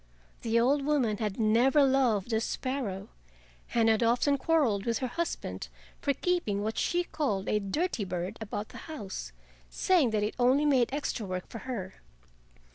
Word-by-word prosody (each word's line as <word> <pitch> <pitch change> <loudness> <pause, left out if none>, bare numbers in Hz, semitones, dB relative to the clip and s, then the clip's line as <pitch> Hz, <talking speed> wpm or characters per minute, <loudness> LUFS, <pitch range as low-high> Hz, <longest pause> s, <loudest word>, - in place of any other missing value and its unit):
The 230 0 +2
old 275 +4 +3
woman 270 -8 +1
had 210 -2 -3
never 240 +6 +4
loved 250 -6 +2
the 220 0 +1
sparrow, 235 -7 -3 0.7
and 230 -1 +4
had 220 0 +3
often 240 +5 +3
quarreled 265 -8 +2
with 230 -1 +1
her 260 - -2
husband 335 +7 -3 0.3
for 285 - +1
keeping 275 - 0
what 220 +1 -2
she 350 0 +1
called 235 - -2
a 210 - +2
dirty 230 - -1
bird 180 +2 -4
about 210 0 -4
the - - -10
house, 210 -12 -6 0.4
saying 350 -10 +3
that 215 -1 0
it 210 - -1
only 260 +4 +4
made 260 -5 +3
extra 275 -5 -2
work 185 -1 -4
for 230 - -7
her. 190 -7 -5
235 Hz, 165 wpm, -29 LUFS, 210-280 Hz, 0.7 s, never